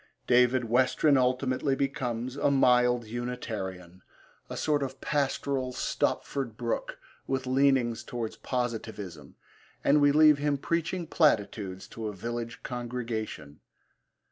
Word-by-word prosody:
David 125 0 +4
Westren 130 +5 +3
ultimately 130 +1 +1
becomes 130 -3 -2
a 145 - +2
mild 125 -3 +4
Unitarian, 105 -7 -5 0.5
a - - -5
sort 150 -2 +1
of 135 -1 -4
pastoral 135 -2 -1
Stopford 125 -2 -2
Brooke 120 -1 -3 0.3
with 130 -1 -1
leanings 130 -3 +2
towards 115 -2 -5
Positivism, 110 - -4 0.5
and 145 +1 +4
we 145 0 +6
leave 150 0 +6
him 145 -1 +1
preaching 170 +4 -1
platitudes 105 - +1
to 110 -1 -5
a 105 - -4
village 115 +3 -5
congregation. 115 - -5
125 Hz, 115 wpm, -28 LUFS, 115-140 Hz, 0.5 s, we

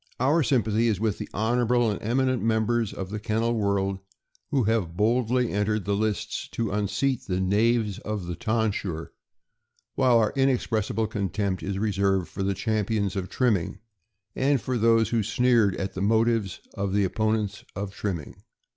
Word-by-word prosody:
Our 145 +7 +3
sympathy 115 -5 +2
is 105 -5 +1
with 110 -2 -1
the - - -6
honorable 120 +1 +1
and 105 - -4
eminent 130 +3 +1
mem 110 0 +1
bers 120 -2 0
of 95 0 -6
the 105 - -3
kennel 115 +2 0
world 100 -3 0 0.5
who 135 -3 +2
have 100 -6 0
boldly 120 +3 +2
entered 105 0 0
the 100 - 0
lists 105 -1 -2
to 115 -3 -2
unseat 125 +6 -1
the 90 -1 -1
knaves 105 +2 +1
of 105 -3 -4
the 90 - -4
tonsure; 105 -7 -2 0.8
while 125 -3 +4
our 110 -2 +2
inexpressible 120 -4 +1
contempt 100 -3 -2
is 95 0 -3
reserved 95 -3 +1
for - - -6
the 95 0 0
champions 105 -2 -1
of 95 -1 -3
trimming, 100 -7 0 0.6
and 135 +1 +2
for 130 +2 -3
those 115 0 +4
who 115 -2 +1
sneered 115 -2 +2
at 95 0 -4
the 95 - -4
motives 110 -2 +1
of 100 -1 -2
the 100 0 +3
opponents 110 +1 -1
of 100 0 -4
trim 100 -3 -2
ming. 75 - -11
110 Hz, 165 wpm, -26 LUFS, 100-115 Hz, 0.8 s, while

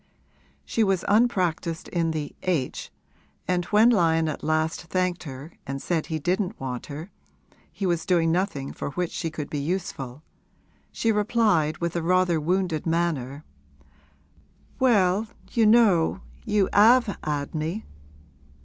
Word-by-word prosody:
She 225 - +1
was 195 -3 +1
unpractised 185 -7 +1
in 170 -2 0
the 155 -2 -4
h, 165 -9 -2 0.6
and 180 -1 0
when 215 +5 +5
Lyon 165 -6 +3
at 155 - -4
last 155 +1 0
thanked 180 +1 -1
her 140 +3 -8 0.2
and 135 0 -3
said 165 +1 -1
he 160 - -2
didn't 185 +6 -1
want 125 -2 -5
her 155 +6 -8 0.6
he 200 - -4
was 170 -3 0
doing 170 -3 +3
nothing 170 -6 -1
for - - -5
which 180 -2 -2
she 165 - -3
could 155 -2 -5
be 145 - -4
useful 145 -4 -4 0.7
she 225 - 0
replied 210 -7 +2
with 170 0 -3
rather 175 0 +2
a - - -2
wounded 175 -1 0
manner, 155 -4 -1 1.3
'Well, 210 -5 +3 0.2
you 225 -2 +3
know 200 -6 +4 0.2
you 210 -3 +2
'ave 225 +1 +5
'ad 145 -1 -3
me!' 160 +7 -3
170 Hz, 140 wpm, -25 LUFS, 155-195 Hz, 1.3 s, when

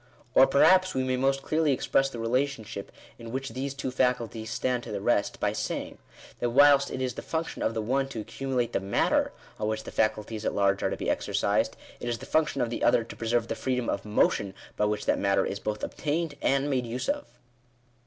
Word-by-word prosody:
Or 135 - +7
perhaps 185 +7 +5
we 130 - +1
may 130 0 0
most 135 +1 +1
clearly 155 -1 +2
express 135 +1 +2
the 120 - -8
relationship 115 -3 -2 0.3
in 115 -1 -8
which 135 +2 -3
these 135 +3 -4
two 135 -2 -3
faculties 120 -4 0
stand 125 +2 -1
to 120 - -8
the 100 - -2
rest, 100 0 +1
by - - 0
saying, - - -4 0.4
that 120 - 0
whilst 140 +2 +6
it 130 - -3
is 125 -1 -1
the - - -6
function 160 0 -3
of 115 - 0
the 110 - -1
one 135 +4 +1
to 135 -4 -6
accumulate 125 +1 -2
the - - +2
matter 95 +1 +1 0.3
on 105 - -1
which 110 0 -2
the - - -8
faculties 110 0 -1
at - - -1
large 100 -1 +2
are - - +1
to - - -3
be - - -4
exercised, - - 0 0.2
it 120 - -4
is 120 - -1
the - - -10
function 150 -4 +1
of 120 -1 0
the - - -3
other 120 -1 +4
to 115 - -10
preserve 115 0 0
the - - -1
freedom 125 -2 -1
of 100 - -1
motion 100 -2 +1 0.2
by 105 - +1
which 105 0 -1
that - - +2
matter 100 -1 +2
is 100 - -3
both 105 +1 -4
obtained 155 +1 -2
and 140 +1 +2
made 130 -4 0
use 120 +2 -3
of. 285 +1 -1
125 Hz, 225 wpm, -28 LUFS, 110-135 Hz, 0.4 s, Or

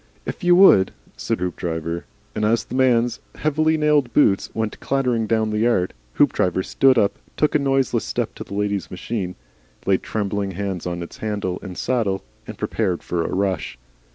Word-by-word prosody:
"If - - -6
you 175 0 +6
would," 175 - +6 0.2
said - - -2
Hoopdriver. 85 -2 -3 0.3
And 105 - -2
as 110 +1 +2
the - - -11
man's 120 -3 +2 0.2
heavily 155 +1 +1
nailed 150 -5 +2
boots 100 -9 +3
went 110 -1 -2
clattering 125 -5 0
down 110 -1 +1
the 105 - -1
yard, 110 -6 +2 0.2
Hoopdriver 95 +1 +2
stood 135 +4 +3
up, 105 -3 +2 0.2
took 150 - +2
a 150 - +4
noiseless 135 -3 +1
step - - -2
to - - -7
the 100 - -8
lady's 100 -3 -1
machine, 90 0 -4 0.5
laid 95 -1 +2
trembling 100 -2 -2
hands 95 -2 -3
on 85 0 -3
its 85 - -10
handle 100 -4 -3
and 95 -3 -8
saddle, 110 -7 0 0.2
and - - -8
prepared 95 -6 -1
for 85 -1 -1
a - - -3
rush. 95 -9 -1
105 Hz, 175 wpm, -22 LUFS, 95-125 Hz, 0.5 s, you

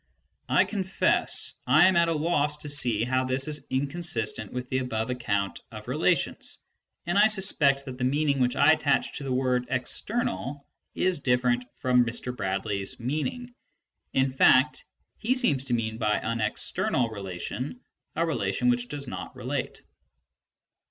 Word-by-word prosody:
I - - +5
confess 190 -3 +1
I 155 +8 +6
am 190 - +3
at 170 0 +4
a 165 - +1
loss 150 -2 +1
to 150 - -6
see 120 -7 +2
how 130 +1 +1
this 130 +2 0
is 150 -1 -3
inconsistent 130 - -2
with 125 0 -5
the 130 0 0
above 115 -2 -2
ac 125 - -4
count 100 -4 -1
of - - -9
relations, - - 0 0.5
and 175 +4 +1
I 210 - +7
suspect 150 -10 +2
that 130 -2 -8
the - - -2
meaning 140 +2 +1
which 125 -1 +1
I - - +6
attach 150 -3 +1
to - - -7
the 135 - -4
word 125 -1 +1
" - - -22
external 140 - -2 0.2
" - - -50
is 185 -4 +2
different 125 -1 +1
from 125 -1 +3
Mr. 120 +1 -4
Bradley's 100 -1 -3
meaning; 155 - -3 0.6
in 130 0 +2
fact 130 +2 +4 0.3
he 250 +4 +1
seems 140 - +1
to 125 -3 0
mean 110 -1 -3
by 105 -2 +1
an 115 0 -2
"external" 115 +2 0
relation 100 - -5 0.4
a 165 - +1
relation 125 -6 0
which 120 0 -1
does 145 0 -5
not 90 -6 -7
relate. - - -4
130 Hz, 165 wpm, -27 LUFS, 120-150 Hz, 0.6 s, I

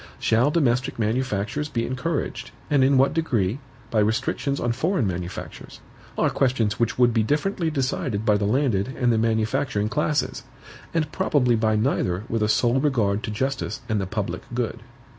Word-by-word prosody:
Shall 115 +5 +2
domestic 135 -4 +1
manufactures 120 +4 -1
be 115 -4 -1
encouraged, 130 -3 -3 0.2
and 140 -3 +4
in 135 +1 +4
what 135 +2 +4
degree, 125 - 0 0.3
by 110 - +2
restrictions 110 +6 0
on 120 - 0
foreign 150 - 0
manufactures? 90 -1 -6 0.4
are - - +2
questions 120 -5 +1
which 115 -1 0
would 120 -1 +4
be 110 - +3
differently 160 - 0
decided 130 -6 -2
by 105 -2 +4
the 100 - -1
landed 120 -4 +1
and 125 -2 +3
the 110 - +2
manufacturing 110 -1 0
classes, 150 +4 0 0.5
and 155 -3 -1
probably 140 -10 +2
by 110 -1 +2
neither 105 -5 0
with 115 -1 -1
a 105 - +2
sole 120 +3 +3
regard 110 -8 +1
to - - -4
justice 130 +6 -2
and 110 -4 0
the 95 - -3
public 105 0 -3
good. 120 -1 -2
120 Hz, 165 wpm, -24 LUFS, 110-140 Hz, 0.5 s, and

